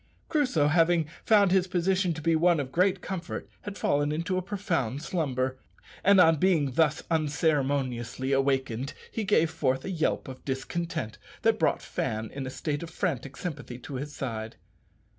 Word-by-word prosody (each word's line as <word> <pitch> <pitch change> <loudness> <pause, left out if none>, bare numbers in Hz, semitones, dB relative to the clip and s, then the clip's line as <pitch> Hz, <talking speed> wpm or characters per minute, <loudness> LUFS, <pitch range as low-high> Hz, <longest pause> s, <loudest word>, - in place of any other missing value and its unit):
Crusoe 255 - +2
having 165 0 +3 0.2
found 205 -4 +5
his 190 -1 +3
position 185 +1 +1
to 160 - -7
be 165 +1 +3
one 170 0 +4
of 135 -2 -3
great 185 +3 +2
comfort 185 -2 -5
had 205 -1 -7
fallen 145 +1 +1
into 170 +5 -1
a 185 - +1
profound 170 - -2
slumber, 130 -7 -1 0.4
and 200 0 +6
on 165 -2 +6
being 155 -5 +2
thus 150 +2 +2
unceremoniously 140 -5 0
awakened 135 -2 0 0.2
he 225 - -2
gave 165 -6 +3
forth 135 -5 0
a 195 - -3
yelp 165 -4 0
of 130 -1 -9
discontent 135 -2 -3 0.2
that - - +3
brought - - +1
Fan 110 0 -3
in 135 -1 -4
a - - -3
state 145 +2 -3
of 170 - -6
frantic 135 -3 -3
sympathy 145 -8 -5
to 125 +3 -9
his 140 +3 -4
side. 115 -6 -5
155 Hz, 165 wpm, -28 LUFS, 135-180 Hz, 0.4 s, and